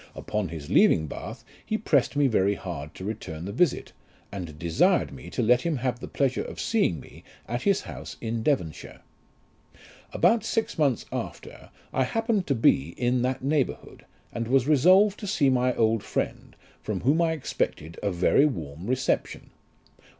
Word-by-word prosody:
Upon 105 Hz, -3 st, -3 dB
his 80 Hz, -3 st, -7 dB
leaving 80 Hz, -, +4 dB
Bath, -, -, -8 dB, 0.2 s
he 220 Hz, -, -1 dB
pressed 145 Hz, -, +1 dB
me 145 Hz, 0 st, +3 dB
very 100 Hz, -5 st, +2 dB
hard 80 Hz, -7 st, -7 dB
to 95 Hz, -, -8 dB
return 85 Hz, -6 st, -5 dB
the 100 Hz, -, -4 dB
visit, 145 Hz, -, 0 dB, 0.4 s
and 85 Hz, -7 st, -7 dB
desired 80 Hz, -3 st, +2 dB
me 65 Hz, -, -10 dB
to -, -, -2 dB
let 125 Hz, +2 st, +4 dB
him 170 Hz, -2 st, -1 dB
have 125 Hz, -1 st, -2 dB
the -, -, -7 dB
pleasure 135 Hz, -2 st, 0 dB
of -, -, -8 dB
seeing 205 Hz, -, +1 dB
me -, -, -14 dB, 0.2 s
at 120 Hz, +1 st, -3 dB
his 200 Hz, +4 st, +2 dB
house -, -, -9 dB
in 115 Hz, 0 st, -3 dB
Devonshire. 110 Hz, -, -2 dB, 1.1 s
About 230 Hz, -1 st, +3 dB
six 225 Hz, -6 st, -2 dB
months 140 Hz, -6 st, +2 dB
after, -, -, -7 dB, 0.2 s
I 130 Hz, -, +2 dB
happened 225 Hz, -, 0 dB
to 140 Hz, -, +1 dB
be 85 Hz, -, +2 dB
in 125 Hz, 0 st, +1 dB
that 130 Hz, +1 st, -1 dB
neighbourhood, 140 Hz, -1 st, -2 dB, 0.3 s
and 115 Hz, -1 st, -3 dB
was 130 Hz, 0 st, +3 dB
resolved 185 Hz, +8 st, +5 dB
to 205 Hz, -, -6 dB
see 145 Hz, -9 st, +2 dB
my 125 Hz, 0 st, +2 dB
old 110 Hz, -1 st, +2 dB
friend, -, -, -4 dB, 0.3 s
from 105 Hz, -4 st, -3 dB
whom 145 Hz, +7 st, +3 dB
I 165 Hz, -1 st, +2 dB
expected 85 Hz, -, -3 dB
a 100 Hz, -, 0 dB
very 90 Hz, +10 st, +3 dB
warm 80 Hz, -, -6 dB
reception. 130 Hz, +1 st, -1 dB
125 Hz, 170 wpm, -26 LUFS, 95-145 Hz, 1.1 s, resolved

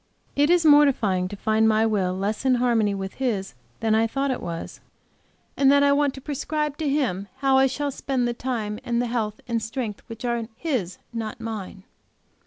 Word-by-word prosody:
It 290 Hz, +2 st, +3 dB
is 350 Hz, -1 st, +4 dB
mortifying 255 Hz, -11 st, +4 dB
to 205 Hz, -, -7 dB
find 220 Hz, +2 st, +2 dB
my 220 Hz, 0 st, +3 dB
will 190 Hz, -4 st, 0 dB
less 205 Hz, +4 st, -2 dB
in 260 Hz, -1 st, +4 dB
harmony 230 Hz, -4 st, +2 dB
with 195 Hz, +3 st, -6 dB
His 210 Hz, -7 st, -1 dB, 0.3 s
than 220 Hz, -1 st, +2 dB
I 225 Hz, +1 st, +3 dB
thought 275 Hz, +4 st, -1 dB
it 255 Hz, -, -3 dB
was; 170 Hz, -1 st, -6 dB, 0.8 s
and 275 Hz, -1 st, +5 dB
that 285 Hz, 0 st, +5 dB
I 285 Hz, -, +5 dB
want 280 Hz, -1 st, +2 dB
to 270 Hz, -, -9 dB
prescribe 300 Hz, +1 st, -2 dB
to 310 Hz, -3 st, -1 dB
Him 240 Hz, -10 st, 0 dB
how 270 Hz, -1 st, +3 dB
I 270 Hz, -, +5 dB
shall 285 Hz, +2 st, -2 dB
spend 260 Hz, -2 st, -1 dB
the 240 Hz, -, -1 dB
time 230 Hz, -4 st, -3 dB
and 235 Hz, -1 st, 0 dB
the 245 Hz, -, +1 dB
health 225 Hz, -3 st, -2 dB
and 235 Hz, -1 st, 0 dB
the -, -, -8 dB
strength 225 Hz, -2 st, -4 dB
which 230 Hz, +1 st, -7 dB
are 235 Hz, -2 st, -1 dB
His, 240 Hz, -, -2 dB, 0.2 s
not 225 Hz, 0 st, -4 dB
mine. 215 Hz, -4 st, -6 dB
235 Hz, 200 wpm, -24 LUFS, 210-275 Hz, 0.8 s, and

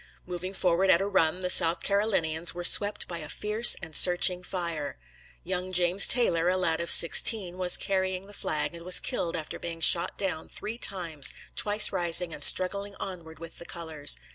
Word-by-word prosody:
Moving 180 Hz, +2 st, -8 dB
forward 185 Hz, +1 st, -1 dB
at 170 Hz, -, +3 dB
a 195 Hz, -, -4 dB
run, 185 Hz, -3 st, -2 dB
the 180 Hz, -, -2 dB
South 165 Hz, +1 st, +2 dB
Carolinians 175 Hz, -6 st, -1 dB
were 175 Hz, -, -8 dB
swept 205 Hz, +3 st, +4 dB
by 170 Hz, -1 st, -8 dB
a 155 Hz, -, -11 dB
fierce 215 Hz, +3 st, +3 dB
and 160 Hz, -2 st, -8 dB
searching 180 Hz, 0 st, +5 dB
fire. 170 Hz, -, -7 dB, 0.5 s
Young 185 Hz, +1 st, -6 dB
James 180 Hz, +1 st, +2 dB
Taylor, 175 Hz, -9 st, +1 dB
a 185 Hz, -, -2 dB
lad 170 Hz, -3 st, -3 dB
of 170 Hz, -, -5 dB
sixteen, 180 Hz, +1 st, +4 dB
was 180 Hz, -1 st, +4 dB
carrying 190 Hz, -1 st, -4 dB
the 205 Hz, -, -16 dB
flag, 155 Hz, -4 st, -4 dB
and 170 Hz, 0 st, -11 dB
was 180 Hz, +1 st, +2 dB
killed 170 Hz, -, -4 dB
after 155 Hz, -, -9 dB
being 165 Hz, -1 st, -8 dB
shot 170 Hz, +1 st, +1 dB
down 180 Hz, -5 st, -6 dB
three 225 Hz, +3 st, -8 dB
times, 170 Hz, -, +1 dB, 0.2 s
twice 210 Hz, 0 st, +3 dB
rising 175 Hz, -1 st, -1 dB
and -, -, -3 dB
struggling 200 Hz, +2 st, +1 dB
onward 170 Hz, -4 st, -9 dB
with 165 Hz, +1 st, -12 dB
the 170 Hz, -, -11 dB
colors. 160 Hz, -, -2 dB
180 Hz, 185 wpm, -25 LUFS, 165-190 Hz, 0.5 s, searching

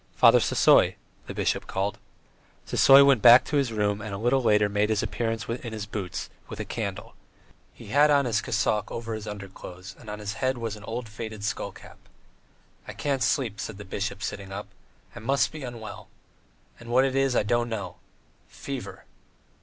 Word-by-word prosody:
"Father -, -, +7 dB
Sisoy," -, -, +4 dB, 0.3 s
the -, -, -5 dB
bishop -, -, -1 dB
called. 95 Hz, +2 st, -2 dB, 0.7 s
Sisoy 140 Hz, +1 st, +7 dB
went 135 Hz, -6 st, +4 dB
back 120 Hz, +3 st, +8 dB
to 150 Hz, -, -1 dB
his 135 Hz, -4 st, +1 dB
room 105 Hz, -1 st, 0 dB
and 105 Hz, -2 st, -5 dB
a -, -, -4 dB
little 120 Hz, +5 st, +2 dB
later 105 Hz, -3 st, +3 dB
made 105 Hz, +1 st, 0 dB
his 110 Hz, -1 st, +1 dB
appearance 115 Hz, -3 st, -2 dB
in 115 Hz, -1 st, -5 dB
his 110 Hz, -2 st, -4 dB
boots, 100 Hz, -4 st, -5 dB, 0.2 s
with -, -, -7 dB
a -, -, -3 dB
candle; -, -, -5 dB, 0.6 s
he -, -, -13 dB
had 145 Hz, +6 st, +5 dB
on 140 Hz, -2 st, +4 dB
his 115 Hz, -3 st, +1 dB
cassock 105 Hz, -1 st, 0 dB
over 115 Hz, -1 st, -5 dB
his 110 Hz, 0 st, -6 dB
underclothes 95 Hz, -1 st, -9 dB
and 110 Hz, -, -11 dB
on 105 Hz, -, -5 dB
his 105 Hz, -1 st, -5 dB
head 130 Hz, 0 st, +1 dB
was 115 Hz, -2 st, -4 dB
an 105 Hz, -, -12 dB
old 115 Hz, +1 st, -5 dB
faded 110 Hz, -1 st, -7 dB
skull 105 Hz, -, -2 dB
cap. -, -, -15 dB, 0.9 s
"I -, -, -6 dB
can't 140 Hz, -3 st, -2 dB
sleep," 120 Hz, -8 st, 0 dB
said 110 Hz, -, -5 dB
the 105 Hz, -, -9 dB
bishop, 100 Hz, +2 st, -4 dB
sitting 100 Hz, -1 st, -5 dB
up. 100 Hz, +2 st, -6 dB, 0.5 s
"I -, -, -7 dB
must 135 Hz, +5 st, +1 dB
be 155 Hz, -, -8 dB
unwell. 120 Hz, -4 st, -8 dB, 0.7 s
And 120 Hz, -, -11 dB
what 130 Hz, +2 st, +4 dB
it 135 Hz, -1 st, -1 dB
is 135 Hz, -2 st, +2 dB
I -, -, +3 dB
don't 120 Hz, +2 st, 0 dB
know. 100 Hz, -5 st, -5 dB, 0.5 s
Fever!" -, -, -7 dB
110 Hz, 190 wpm, -26 LUFS, 105-125 Hz, 0.9 s, back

